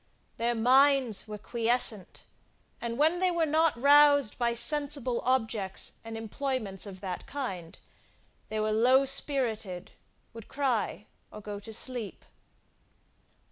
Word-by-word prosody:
Their 235 +1 0
minds 255 -1 +3
were 210 0 -6
quiescent, 230 -2 -1 0.6
and 235 0 -4
when 320 +5 +2
they 370 0 +3
were 340 -2 +1
not 315 -3 +2
roused 285 -2 +5
by 235 -1 +1
sensible 280 -2 -1
objects 225 -6 0
and 225 0 -7
employments 225 -3 -4
of 190 -1 -10
that 185 -3 -6
kind, 190 - -6 0.7
they 215 - -3
were 215 0 0
low 255 +5 +4
spirited, 225 -9 -2 0.4
would 230 -2 -11
cry, 240 - -2 0.3
or 215 - -9
go 205 -1 -7
to 215 +2 -10
sleep. 235 -1 -4
235 Hz, 125 wpm, -29 LUFS, 215-275 Hz, 0.7 s, roused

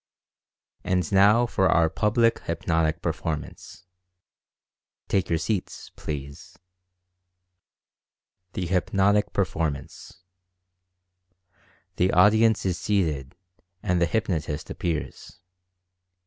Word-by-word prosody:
And 90 -3 -1
now 105 +5 +5
for 95 -5 +1
our 85 0 +4
public 115 +6 +1
hypnotic 80 -1 -1
performance. 80 +1 -5 1.2
Take 95 -2 0
your 80 - +2
seats, 100 +2 -4
please. 70 -2 -7 2.0
THE 90 - -3
HYPNOTIC 95 +3 +1
PERFORMANCE. 80 -1 -3 1.7
The 90 +2 +2
audience 110 +4 +4
is 90 -2 -1
seated, 80 -8 -1 0.5
and 90 -3 0
the 85 - +3
hypnotist 80 -8 -2
appears. 85 +1 -5
90 Hz, 80 wpm, -25 LUFS, 80-100 Hz, 2.0 s, now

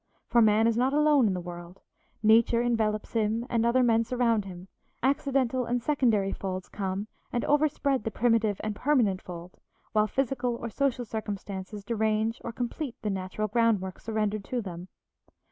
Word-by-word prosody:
For 235 - +3
man 220 0 +4
is 230 -1 +3
not 255 +3 +2
alone 300 -5 +4
in 190 - 0
the - - -2
world; 175 +1 -9 0.4
nature 225 +2 +5
envelops 220 -3 0
him 225 +1 0
and 230 -1 +2
other 240 +2 +3
men 230 -1 +3
surround 230 -3 +1
him; 180 -1 -9 0.4
accidental 265 -2 +1
and 245 +1 0
secondary 230 -7 +1
folds 185 -1 -5
come 195 0 -3 0.3
and 240 - -1
overspread 285 -4 +1
the - - -1
primitive 225 -3 +1
and 215 -1 -2
permanent 235 -8 +2
fold, 175 0 -9 0.3
while 215 0 +3
physical 250 0 -1
or 235 -1 -6
social 260 -1 0
circumstances 205 -2 -5
derange 220 0 0
or 235 - -4
complete 245 +3 -4
the 210 - 0
natural 190 +2 -3
groundwork 210 -4 +1
surrendered 215 -2 -2
to 250 - -2
them. 180 -4 -7
225 Hz, 160 wpm, -28 LUFS, 205-245 Hz, 0.4 s, nature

